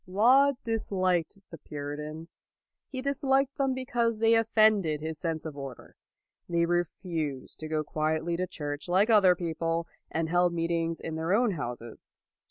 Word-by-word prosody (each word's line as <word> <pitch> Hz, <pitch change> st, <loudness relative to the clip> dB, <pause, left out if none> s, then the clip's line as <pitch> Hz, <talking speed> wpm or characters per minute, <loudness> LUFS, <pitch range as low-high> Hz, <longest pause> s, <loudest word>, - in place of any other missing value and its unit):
Laud 255 Hz, +9 st, +5 dB
disliked 190 Hz, -6 st, 0 dB
the 165 Hz, -, -9 dB
Puritans. 150 Hz, +3 st, -7 dB, 0.5 s
He 260 Hz, -2 st, -4 dB
dis 280 Hz, 0 st, -2 dB
liked 270 Hz, 0 st, +2 dB
them 270 Hz, -1 st, +1 dB
because 240 Hz, -3 st, 0 dB
they 225 Hz, +1 st, +4 dB
offended 215 Hz, -8 st, +3 dB
his 155 Hz, 0 st, -5 dB
sense 165 Hz, -2 st, -3 dB
of 155 Hz, -3 st, -6 dB
order. 135 Hz, -2 st, -9 dB, 0.5 s
They 170 Hz, 0 st, +2 dB
refused 170 Hz, -5 st, -3 dB
to 155 Hz, -, -5 dB
go 155 Hz, -1 st, -1 dB
quietly 155 Hz, +2 st, -1 dB
to 185 Hz, +1 st, -1 dB
church 145 Hz, 0 st, -5 dB
like 195 Hz, +6 st, +3 dB
other 195 Hz, -4 st, +6 dB
people, 165 Hz, -1 st, -2 dB, 0.2 s
and 165 Hz, 0 st, -1 dB
held 175 Hz, +1 st, +2 dB
meet 165 Hz, 0 st, -1 dB
ings 165 Hz, -1 st, -1 dB
in 160 Hz, -, -5 dB
their 165 Hz, +3 st, 0 dB
own 235 Hz, +1 st, +3 dB
houses. 120 Hz, -, -7 dB
170 Hz, 160 wpm, -28 LUFS, 155-220 Hz, 0.5 s, other